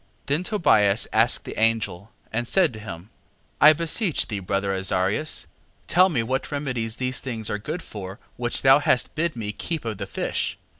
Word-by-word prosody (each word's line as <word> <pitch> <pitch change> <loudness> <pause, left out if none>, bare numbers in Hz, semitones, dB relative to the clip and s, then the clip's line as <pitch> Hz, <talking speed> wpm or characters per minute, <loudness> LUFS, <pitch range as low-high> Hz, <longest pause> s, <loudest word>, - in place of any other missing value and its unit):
6:7. - - -40
Then 145 +4 0
Tobias 110 - +3
asked 115 +2 +4
the - - -6
angel, 110 -3 0 0.2
and 120 +1 -1
said 180 -5 +2
to 110 - -9
him: 100 -1 -9 0.5
I 150 - +10
beseech 165 +3 0
thee, 105 -3 -3
brother 100 +1 -1
Azarias, 95 +9 -1 0.4
tell 185 +2 +4
me 125 -10 0
what 130 +6 -3
remedies 125 -6 -2
are - - -20
these 130 0 -2
things 115 -5 -4
good 165 +3 -4
for, 95 -2 -8 0.2
which 120 0 -2
thou 135 +1 +7
hast 130 -3 +2
bid 165 +1 -1
me 105 -3 -3
keep 160 +5 -5
of 110 -3 -4
the 100 - -4
fish? - - -2
115 Hz, 185 wpm, -24 LUFS, 105-150 Hz, 0.5 s, I